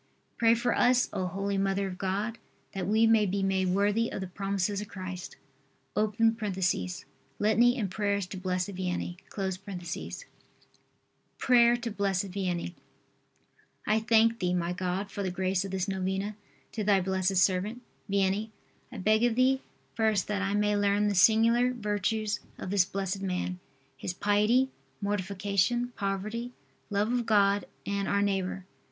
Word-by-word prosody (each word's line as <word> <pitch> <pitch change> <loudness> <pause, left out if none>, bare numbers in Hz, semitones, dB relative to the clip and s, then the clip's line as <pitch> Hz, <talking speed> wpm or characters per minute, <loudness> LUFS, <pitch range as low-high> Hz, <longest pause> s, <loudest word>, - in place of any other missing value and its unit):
Pray 230 0 +5
for 235 +1 0
us, 250 0 +3
O 185 - -1
holy 195 +2 -2
Mother 195 0 0
of 185 -1 -6
God, 205 +4 -2 0.3
that 190 -2 -3
we 220 +2 +4
may 225 -2 +4
be 190 -1 0
worthy 205 +5 +1
of - - -4
the 190 - -3
promises 195 +2 -2
of 210 - -7
Christ. 185 -2 -7 0.6
[Litany 215 +1 +3 1.5
and 200 -6 -2
prayers 200 -1 0
to 185 - -8
Blessed 185 0 -1
Vianney.] 180 -1 -3 2.2
PRAYER 240 -2 +5
TO 235 -1 -4
BLESSED 200 -2 0
VIANNEY. 180 -2 -3 1.1
I 215 +1 +3
thank 225 +1 +3
Thee, 180 0 0
my 175 0 -1
God, 185 +2 -3
for 205 - -4
the 190 - -1
grace 185 +1 0
of 195 - -5
this 190 0 -2
novena 190 +2 -2 0.4
to 215 - -3
Thy 200 -1 +4
blessed 190 0 0
servant, 195 +6 +1 0.3
Vianney. 200 +2 +1 0.4
I - - -8
beg 215 +3 +2
of 240 -2 +3
Thee, 260 +2 +3 0.3
first, 220 -4 +1
that 205 -1 0
I 200 +1 0
may 210 0 +2
learn 205 0 +2
the - - 0
singular 230 +5 +5
virtues 210 -1 -1 0.2
of 185 - -6
this 200 -3 +4
blessed 195 0 -3
man 180 -1 -2 0.4
his 175 +6 -5
piety, 210 +7 +2 0.3
mortification, 200 +3 0
poverty, 215 +3 -3 0.4
love 205 +2 0
of 240 -2 -1
God 200 -2 +3 0.2
and 200 0 -1
our 200 0 +2
neighbor. 190 -2 -1
200 Hz, 145 wpm, -29 LUFS, 190-220 Hz, 2.2 s, Pray